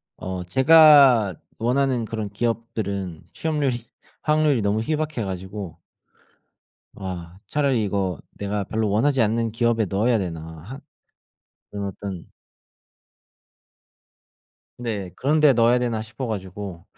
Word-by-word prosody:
어 95 -1 -5
제가 130 - +6 0.2
원하는 125 0 +1
그런 110 -2 -4
기업들은 100 -7 -3
취업률이 140 -7 -1 0.4
확률이 150 -5 +2
너무 100 +2 +1
희박해 155 -2 -2
가지고 95 -1 -6 1.2
'와. 90 -2 -7
차라리 135 -6 +1
이거 95 -4 -1
내가 100 0 -3
별로 110 +1 -1
원하지 125 +5 +2
않는 115 +1 0
기업에 115 -1 +1
넣어야 110 +5 +1
되나?' 85 -4 -4 0.2
하 130 +9 -9 0.9
그런 100 -1 -4
어떤 95 -2 -7 2.5
네. 105 -7 -4
'그런 150 +4 +1
데 150 -2 +7
넣어야 120 0 +4
되나?' 120 -3 -1
싶어 115 +4 -6
가지고 95 -4 -6
110 Hz, 245 characters per minute, -23 LUFS, 100-130 Hz, 2.5 s, 데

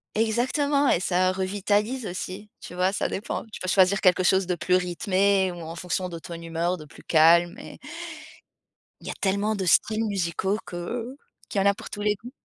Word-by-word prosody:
Exactement 265 +6 +2
et - - +3
ça 185 0 +2
revitalise 205 +5 -1
aussi, 185 +3 -6
tu - - -10
vois? 180 +1 +1
Ça 200 - -1
dépend. 215 +5 -4
Tu - - -7
peux 185 - -5
choisir 190 +1 +4
quelque 185 0 +4
chose 190 0 +3
de 180 - 0
plus 180 +2 +1
rythmé 190 +1 +2
ou 175 - -9
en 165 0 -7
fonction 180 +1 -3
de 170 - -6
ton 170 +1 -9
humeur, 170 +2 -2
de 155 - -10
plus 150 - -16
calme 170 +2 +5
et - - -10 1.2
il - - -11
y - - -2
a - - -4
tellement 200 +2 +1
de 195 -2 -2
styles 220 +5 +3
musicaux 190 0 -1
que 230 +9 -5 0.3
qu'il 200 - 0
y - - +2
en - - +4
a 200 - +5
pour - - -10
tous 205 - -6
les 210 0 +2
goûts. 235 +5 -11
190 Hz, 205 wpm, -25 LUFS, 175-210 Hz, 1.2 s, calme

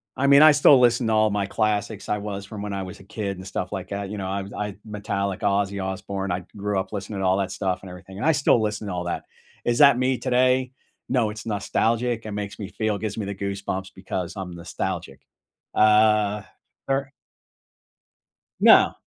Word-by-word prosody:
I 140 - +1
mean, 140 +2 +8
I 155 - +9
still 145 -2 +6
listen 120 -1 +3
to 110 - +2
all 110 0 +4
my 100 -1 0
classics 105 0 -1
I 105 - 0
was 100 -1 -5
from 105 0 -8
when 105 -1 -4
I 95 - -3
was 95 - -9
a 95 - -14
kid, 100 -1 -4
and 95 - -9
stuff 90 -1 -4
like 95 -2 -5
that, 100 -1 -4
you 105 - -5
know, 95 - -3
I'm 100 +1 -4
I'm 105 -1 -5
Metallica, 100 -2 -3
Ozzy 100 -1 0
Osbourne, 95 0 -4
I 90 0 -3
grew 100 -1 -1
up 95 - -5
listening 100 0 -5
to 95 - -1
all 95 +1 +3
that 95 -2 -1
stuff 95 -1 -2
and 95 - -10
everything, 90 +2 -11
and - - -3
I 160 - +5
still 135 -5 +3
listen 105 -1 -2
to 95 - -3
all 90 -1 -3
that. 85 - -3 0.4
Is 120 0 +1
that 140 -4 +7
me 130 0 +1
today? 130 +1 +2 0.4
No, 115 -5 +2
it's 110 +1 -9
nostalgic. 115 +2 0
It 105 - -5
makes 100 0 -5
me 100 - -5
feel 110 -1 -1
gives 110 -1 -4
me 105 - -2
the 100 - -4
goosebumps 100 -1 -4
because 95 -1 -4
I'm 95 -2 -5
nostalgic, 85 -3 -5 0.5
uh, 105 -1 +4 0.4
fair 135 0 -1 1.5
No. - - +6
100 Hz, 205 wpm, -24 LUFS, 95-110 Hz, 1.5 s, I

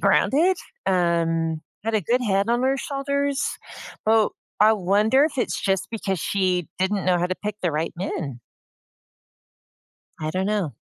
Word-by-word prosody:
grounded, 340 +7 +3 0.3
um, 165 -3 +1 0.2
had 225 0 -1
a 215 - +3
good 245 +7 +1
head 200 -1 +1
on 240 +1 +2
her 265 +1 +2
shoulders. 280 0 -1 0.7
Well, 220 -1 +4 0.3
I 215 +1 +7
wonder 210 +7 +3
if 300 -3 -2
it's - - -1
just 195 -2 0
because 195 -4 -2
she 185 -1 0
didn't 190 0 0
know 180 -1 +3
how 175 - +2
to 185 - -2
pick 210 -1 -4
the 175 - +2
right 155 +2 -1
men. 160 -8 -4 1.8
I 155 0 -2
don't 185 +3 -1
know. 200 - -1
195 Hz, 155 wpm, -24 LUFS, 175-240 Hz, 1.8 s, I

